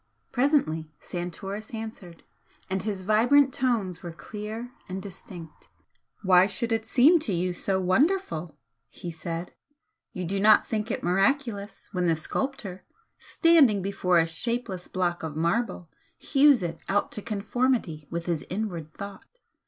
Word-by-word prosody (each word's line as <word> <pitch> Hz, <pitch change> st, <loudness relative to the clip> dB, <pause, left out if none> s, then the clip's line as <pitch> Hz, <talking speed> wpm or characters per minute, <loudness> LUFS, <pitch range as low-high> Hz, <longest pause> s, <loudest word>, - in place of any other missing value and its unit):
Presently 245 Hz, -, +1 dB
Santoris 195 Hz, +5 st, -6 dB
answered, 215 Hz, -6 st, -8 dB, 0.5 s
and 190 Hz, 0 st, 0 dB
his 200 Hz, -3 st, -3 dB
vibrant 245 Hz, +7 st, +4 dB
tones 220 Hz, -9 st, 0 dB
were 175 Hz, -, -6 dB
clear 215 Hz, +7 st, -7 dB, 0.2 s
and 185 Hz, +1 st, -3 dB
distinct. 180 Hz, -4 st, -10 dB, 0.5 s
"Why 185 Hz, -1 st, +6 dB
should 220 Hz, +4 st, -2 dB
it 225 Hz, 0 st, 0 dB
seem 290 Hz, +9 st, +6 dB
to 270 Hz, -9 st, -2 dB
you 180 Hz, 0 st, 0 dB
so 190 Hz, +2 st, -1 dB
wonderful?" 185 Hz, -, +1 dB, 0.3 s
he 170 Hz, +5 st, -7 dB
said 165 Hz, +1 st, -5 dB, 0.6 s
"You 180 Hz, -2 st, -4 dB
do 195 Hz, +3 st, -1 dB
not 215 Hz, +2 st, +6 dB
think 215 Hz, 0 st, -2 dB
it -, -, -3 dB
miraculous 205 Hz, +3 st, 0 dB
when 180 Hz, -3 st, 0 dB
the 165 Hz, -, +3 dB
sculptor, 195 Hz, -, -4 dB, 0.4 s
standing 280 Hz, -, +4 dB
before 185 Hz, -2 st, +1 dB
a 165 Hz, -, +5 dB
shapeless 190 Hz, +2 st, -3 dB
block 175 Hz, -2 st, -1 dB
of 160 Hz, -2 st, -5 dB
marble, 180 Hz, +3 st, 0 dB, 0.3 s
hews 280 Hz, -6 st, +4 dB
it 165 Hz, -1 st, -4 dB
out 205 Hz, +1 st, +1 dB
to 210 Hz, -, -4 dB
conformity 210 Hz, -, -1 dB
with 170 Hz, 0 st, -4 dB
his 170 Hz, -3 st, -1 dB
inward 180 Hz, -6 st, -4 dB
thought. 200 Hz, -, -9 dB
195 Hz, 140 wpm, -27 LUFS, 175-235 Hz, 0.6 s, Why